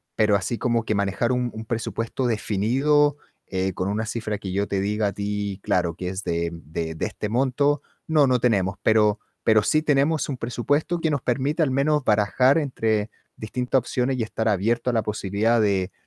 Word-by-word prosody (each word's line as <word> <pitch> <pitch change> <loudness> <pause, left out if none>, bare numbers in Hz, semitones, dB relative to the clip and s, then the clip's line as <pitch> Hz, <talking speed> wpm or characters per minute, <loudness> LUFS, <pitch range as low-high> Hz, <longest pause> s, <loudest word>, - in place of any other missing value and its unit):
Pero 105 -2 +3
así 100 +5 -3
como 120 -2 0
que 110 - 0
manejar 100 +5 0
un 125 -1 -1
un 110 0 -7
presupuesto 115 +2 -3
definido, 135 +8 +2 0.3
eh, 95 -1 -1
con 95 +2 -2
una 110 +2 -1
cifra 110 -2 -3
que 95 -2 -6
yo 100 +1 0
te 100 - -1
diga 105 +2 0
a 100 - -3
ti 100 -1 -3
claro 85 -2 0
que 90 - -5
es 95 +1 -5
de 85 0 -1
de 80 0 -5
de - - -2
este 105 - -4
monto, 135 +4 +1 0.3
no, 150 -4 +4
no 125 -1 +2
tenemos. 100 -5 +1
Pero 105 -1 +3 0.2
pero 110 -1 +4
sí 155 +7 +2
tenemos 150 0 +1
un 135 - -3
presupuesto 145 +8 -1
que 160 - 0
nos 145 - 0
permite 140 +6 0
al 135 - 0
menos 145 +2 +2
barajar 110 +6 +3
entre 110 -7 -1 0.3
distintas 125 +4 0
opciones 125 +1 -1
y 115 - +1
estar 110 +1 -3
abierto 115 +4 +1
a - - -6
la 115 - +2
posibilidad 105 +2 0
de 100 -2 +1
110 Hz, 195 wpm, -24 LUFS, 100-130 Hz, 0.3 s, no